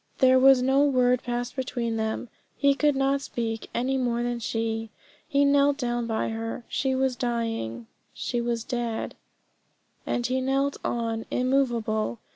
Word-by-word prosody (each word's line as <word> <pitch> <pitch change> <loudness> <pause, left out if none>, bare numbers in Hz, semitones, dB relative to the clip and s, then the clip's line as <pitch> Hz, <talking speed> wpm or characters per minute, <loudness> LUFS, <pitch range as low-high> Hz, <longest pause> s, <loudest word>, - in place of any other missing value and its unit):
There 260 -1 +5
was 265 -1 +6
no 265 +2 +4
word 250 -3 +3
passed 245 0 -3
between 245 -3 -2
them. 220 +2 -2 0.3
He 280 0 +4
could 295 +1 +2
not 275 +1 +1
speak, 225 -4 -4
any 265 +2 0
more 240 -1 0
than 240 0 -1
could - - -9
she. 225 0 -2 0.4
He 285 -2 +3
knelt 280 0 +4
down 240 -3 -1
by 225 -1 -1
her. 225 +1 -5
She 265 -1 0
was 260 -1 +1
dying; 225 - -2 0.3
she 240 -1 -2
was 235 -1 -1
dead; 235 -2 -3 0.9
and 240 - -1
he 260 +2 0
knelt 275 +2 0
on 230 -1 -2
immovable. 240 -4 0
245 Hz, 155 wpm, -26 LUFS, 230-265 Hz, 0.9 s, was